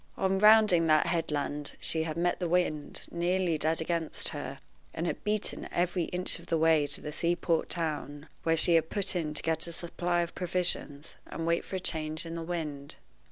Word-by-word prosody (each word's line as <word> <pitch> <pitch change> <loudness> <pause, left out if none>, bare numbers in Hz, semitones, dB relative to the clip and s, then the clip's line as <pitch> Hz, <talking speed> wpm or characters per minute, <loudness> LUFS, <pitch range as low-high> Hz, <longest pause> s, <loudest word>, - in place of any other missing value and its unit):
On 190 0 +1
rounding 210 -5 +6
that 155 -1 +4
headland 150 -3 -2
she 160 - -1
had 160 0 -3
met 175 +1 +1
the 175 -2 -1
wind 160 -4 0
nearly 175 0 +1
dead 160 +2 +1
against 165 -1 -1
her, - - -6 0.4
and 165 - -2
had - - -3
beaten 210 0 -1
every 175 0 0
inch 180 +2 -2
of - - -15
the 165 - +1
way 160 -2 +4
to - - +1
the 150 - -5
sea 170 +3 +1
port 165 -2 0
town, 150 -3 -3
where 165 0 +2
she 170 +2 +6
had 160 -1 +3
put 200 -2 -1
in 155 -3 -2
to - - +1
get 160 +1 +1
a - - -5
supply 175 +1 -1
of 170 0 -4
provisions, 175 -4 -2
and - - -6
to - - -1
wait 170 0 +1
for - - -6
a - - -1
change 160 -2 -3
in 165 - -6
the 165 - -4
wind. 155 -4 -5
165 Hz, 205 wpm, -30 LUFS, 155-175 Hz, 0.4 s, rounding